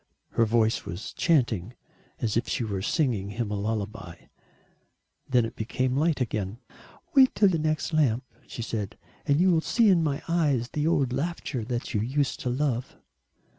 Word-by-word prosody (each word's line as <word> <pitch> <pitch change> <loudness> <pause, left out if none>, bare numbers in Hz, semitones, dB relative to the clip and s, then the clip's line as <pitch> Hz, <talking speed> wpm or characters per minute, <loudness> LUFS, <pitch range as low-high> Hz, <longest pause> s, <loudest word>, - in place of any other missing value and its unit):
Her 115 - +2
voice 115 0 +2
was 90 +5 -6
chanting 120 - +1 0.4
as 110 -3 -1
if 115 - 0
she - - -1
were 100 -4 -3
singing 115 - 0
him 110 0 -3
a - - -1
lullaby 105 -3 -3 1.1
then 125 -3 +3
it 115 - -7
became 125 +3 -1
light 155 +1 +2
again. 110 -4 -2 0.6
"Wait 265 -2 +6
till 205 - +5
the 170 -3 0
next 155 +1 -1
lamp," 130 -6 +2 0.2
she 115 - -6
said. 105 -3 -4 0.3
"And 145 0 +3
you 185 +1 +5
will 165 -2 +3
see 230 +5 +3
in 180 -3 +5
my 145 -3 -1
eyes 145 -8 +1
the 150 +1 -1
old 140 -7 +2
laughter 140 -4 -3
that 120 +2 -3
you 105 - +1
used 135 +4 -1
to 125 - -2
love." 125 -1 -1
125 Hz, 170 wpm, -27 LUFS, 110-155 Hz, 1.1 s, Wait